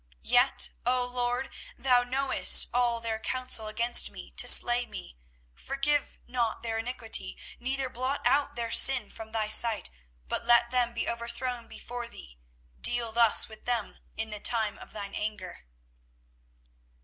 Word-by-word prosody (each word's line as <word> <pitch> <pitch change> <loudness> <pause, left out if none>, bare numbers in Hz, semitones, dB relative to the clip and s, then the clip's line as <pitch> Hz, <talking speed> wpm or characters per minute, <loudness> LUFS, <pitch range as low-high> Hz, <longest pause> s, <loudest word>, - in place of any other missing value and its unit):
24:018:023 - - -5
Yet, - - +3 0.2
LORD, 245 0 -1 0.3
thou 250 -2 +2
knowest 265 +2 +2
all 240 -1 0
their 225 -1 -5
counsel 255 -2 -1
against 235 +3 +4
me - - -12
to - - 0
slay 240 0 +5
me: - - -11 0.4
forgive 275 - -2
not 240 -3 -3
their 225 -1 -4
iniquity, 225 -4 -3 0.2
neither 265 +2 -3
blot 255 +3 -4
out 285 +1 +1
their 230 -1 -5
sin 255 -6 +4
from 220 -1 -11
thy 220 -1 -2
sight, 215 - +6 0.4
but - - -3
let 235 0 +3
them 245 -2 0
be 230 - -3
overthrown 235 +1 -5
before 245 0 -8
thee; - - -14 0.4
deal 235 -2 +1
thus 230 -1 +4
with 220 -1 -14
them 240 -4 -3 0.2
in 220 0 -4
the 210 - -6
time 220 -1 0
of - - -14
thine 200 -2 -8
anger. 205 - -7
235 Hz, 150 wpm, -27 LUFS, 220-250 Hz, 0.4 s, sight